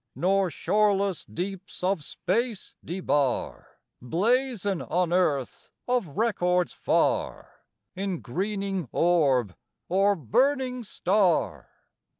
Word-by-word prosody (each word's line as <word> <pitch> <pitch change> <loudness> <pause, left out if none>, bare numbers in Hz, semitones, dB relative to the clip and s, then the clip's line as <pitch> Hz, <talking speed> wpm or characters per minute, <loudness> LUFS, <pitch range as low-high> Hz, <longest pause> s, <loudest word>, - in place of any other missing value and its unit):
Nor 190 +1 +2
shoreless 200 0 +1
deeps 185 +1 -6
of 185 -4 +1
space 230 - -2
debar 145 -7 -2 0.2
Blazon 205 - 0
on 175 0 0
earth 145 -8 0 0.2
of 240 - -1
records 180 -6 +1
far, - - -1 0.4
In 190 -2 -3
greening 195 - -3
orb 135 - +2 0.3
or 195 +2 +3
burning 255 - +1
star. 195 -4 +1
190 Hz, 90 wpm, -26 LUFS, 170-210 Hz, 0.4 s, or